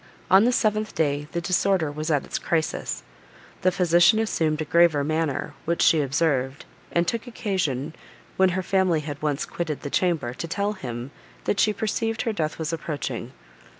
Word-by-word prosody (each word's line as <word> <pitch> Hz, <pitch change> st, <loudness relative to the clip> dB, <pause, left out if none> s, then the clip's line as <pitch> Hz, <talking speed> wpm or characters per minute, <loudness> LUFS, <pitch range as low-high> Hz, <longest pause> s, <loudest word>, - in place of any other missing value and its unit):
On 195 Hz, +4 st, +7 dB
the 245 Hz, -, +4 dB
seventh 215 Hz, -3 st, 0 dB
day, 145 Hz, -1 st, 0 dB
the 170 Hz, -, -2 dB
disorder 185 Hz, -3 st, +1 dB
was 155 Hz, +2 st, -4 dB
at 145 Hz, -3 st, +1 dB
its -, -, -3 dB
crisis. 160 Hz, -2 st, -2 dB, 0.6 s
The 185 Hz, -, +3 dB
physician 175 Hz, +2 st, +4 dB
assumed 160 Hz, -8 st, 0 dB
a 155 Hz, -, -1 dB
graver 165 Hz, -2 st, +4 dB
manner, 155 Hz, -1 st, -1 dB
which 170 Hz, +1 st, +1 dB
she 160 Hz, -, +5 dB
observed, 135 Hz, -1 st, 0 dB, 0.3 s
and 170 Hz, 0 st, +1 dB
took 230 Hz, +6 st, -2 dB
occasion, 165 Hz, -, -2 dB, 0.4 s
when 190 Hz, 0 st, +4 dB
her 185 Hz, -, -1 dB
family 185 Hz, -4 st, +2 dB
had 145 Hz, -1 st, -6 dB
once 150 Hz, -2 st, -1 dB
quitted 160 Hz, -4 st, -4 dB
the 145 Hz, -, -6 dB
chamber, 165 Hz, -10 st, +1 dB
to 165 Hz, -, -5 dB
tell 200 Hz, +5 st, -1 dB
him, 125 Hz, -, -6 dB, 0.3 s
that 200 Hz, -, 0 dB
she 215 Hz, -, +4 dB
perceived 225 Hz, +2 st, -1 dB
her 230 Hz, -3 st, -1 dB
death 155 Hz, -6 st, -2 dB
was 160 Hz, 0 st, -3 dB
approaching. 145 Hz, -7 st, -4 dB
165 Hz, 175 wpm, -25 LUFS, 145-190 Hz, 0.6 s, On